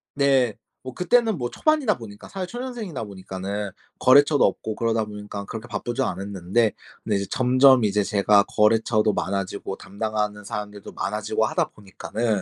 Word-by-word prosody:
네. 135 -5 +3 0.3
뭐 130 -1 -7
그때는 225 +2 +2
뭐 120 -3 -2
초반이다 300 - +2
보니까 105 -3 -11
사회 190 -2 -5
초년생이다 240 - -5
보니까는 100 0 -5 0.3
거래처도 145 +3 +6
없고 105 +2 -2
그러다 115 -1 0
보니까 105 -1 -7
그렇게 110 +3 -7
바쁘지 120 +2 -3
않았는데 100 +1 0 0.3
근데 105 - 0
이제 100 0 -1
점점 130 0 +5
이제 105 0 +2
제가 100 +1 +4
거래처도 110 0 +3
많아지고 95 0 -3
담당하는 105 0 -3
사람들도 105 -1 -7
많아지고 110 +2 -1
하다 - - 0
보니까는 105 +1 -3
110 Hz, 395 characters per minute, -24 LUFS, 100-130 Hz, 0.3 s, 거래처도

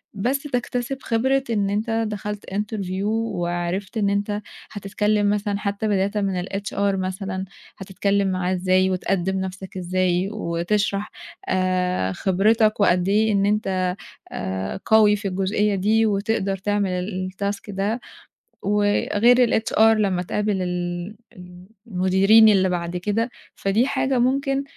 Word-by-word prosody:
بس 255 +8 -1
تكتسب 245 -1 -2
خبرة 265 +4 +1
إن 205 -3 +1
أنت 225 +2 0
دخلت 210 0 -5
interview 195 -2 -3
وعرِفت 190 -2 -2
إن 205 -2 +2
أنت 205 +1 -1 0.3
هتتكلّم 210 0 0
مثلًا 205 -1 -1
حتى 205 +1 -2
بدايةً 195 -1 +1
من 185 -2 -1
الHR 200 +1 -2
مثلًا 190 0 -3 0.3
هتتكلّم 200 +1 0
معاه 185 0 -1
إزاي 185 +1 +2
وتقدّم 190 +1 -1
نَفْسك 190 0 -6
إزاي 185 +1 0
وتشرح 200 +2 -1 0.4
آآ، 185 - 0
خبرتك 215 - +2
وقد 180 -1 +3
إيه 215 +2 +3
إن 200 0 +2
أنت 190 -3 0 0.4
آآ، 95 - -4
قوي 215 -1 +5
في 200 0 -4
الجُزئيّة 200 +2 0
دي 215 +4 +2
وتقدر 200 -1 0
تعمل 185 -1 -2
الtask 200 0 -2
ده 200 +5 -1 0.6
وغير 210 +4 +3
الHR 220 - -3
لمّا 215 -5 +4
تقابل 205 +1 -1
ال 175 +2 -3 0.2
ال 180 0 -13 0.2
المديرين 195 +3 +5
اللي 190 -2 +3
بعد 175 0 -2
كده، 210 +6 -1 0.3
فدي 215 +7 +1
حاجة 265 -2 0
ممكن 275 +2 +1
200 Hz, 125 wpm, -22 LUFS, 185-215 Hz, 0.6 s, قوي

